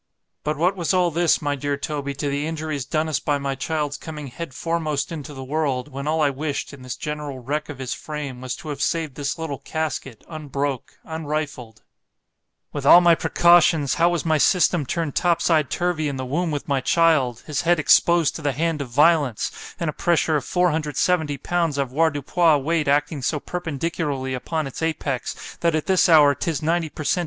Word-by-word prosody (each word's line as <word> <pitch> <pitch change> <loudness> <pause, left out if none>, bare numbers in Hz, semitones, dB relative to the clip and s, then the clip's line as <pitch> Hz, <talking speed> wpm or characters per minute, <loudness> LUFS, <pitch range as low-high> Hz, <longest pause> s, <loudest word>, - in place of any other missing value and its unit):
But 150 0 -1
what 180 +5 +2
was 180 0 0
all 180 -2 +3
this, 170 0 +2
my 145 -1 0
dear 145 +1 -2
Toby, 145 -2 -4
to 145 +1 -3
the 145 +2 -1
injuries 155 -4 -3
done 155 0 -1
us 155 - 0
by 145 -1 0
my 140 -1 -2
child's 145 +1 -2
coming 150 -3 -7
head 165 +4 -7
foremost 155 0 -2
into 150 -2 -6
the 135 -2 -8
world, 140 -1 -1
when 140 +1 -6
all 160 +1 +1
I 145 - +3
wished, 145 +1 -4
in 140 - -11
this 130 -1 -5
general 150 -2 -5
wreck 145 +5 -3
of 145 - -7
his 130 -2 -4
frame, 145 -5 -6
was 130 -1 -4
to 155 - -9
have 145 -1 -5
saved 160 -4 -1
this 140 +1 -3
little 160 -4 -4
casket 145 -7 -4
unbroke, 145 -4 -4
unrifled.—— 150 -7 -5 0.9
With 145 - -4
all 160 +5 +9
my 175 -1 +5
precautions, 165 -4 +4
how 170 - +6
was 175 -2 -2
my 160 -2 +2
system 175 -3 +3
turned 165 -2 -2
topside 165 -4 +2
turvy 175 -3 -1
in 140 -2 -3
the 130 - -4
womb 165 +7 -1
with 145 -2 -4
my 140 -2 +1
child! 140 -6 +2
his 150 -3 -2
head 175 +1 +3
exposed 165 +1 +4
to - - -9
the 145 -2 0
hand 160 +2 -1
of 135 - -5
violence, 145 -2 +3 0.3
and 170 - -2
a 155 - -1
pressure 165 -2 +1
of 145 - 0
470 160 -2 +1
pounds 165 0 -1
avoirdupois 150 +3 +2
weight 155 +2 0
acting 145 +1 +1
so 150 +4 -1
perpendicularly 150 -5 -3
upon 155 +5 -2
its 135 - -7
apex—that 160 +1 -2
at 155 - -1
this 190 -2 +3
hour 150 -3 +7
'tis 155 +1 -3
ninety 165 0 0
_per 155 - -8
Cent. 180 - +2
150 Hz, 195 wpm, -23 LUFS, 140-165 Hz, 0.9 s, all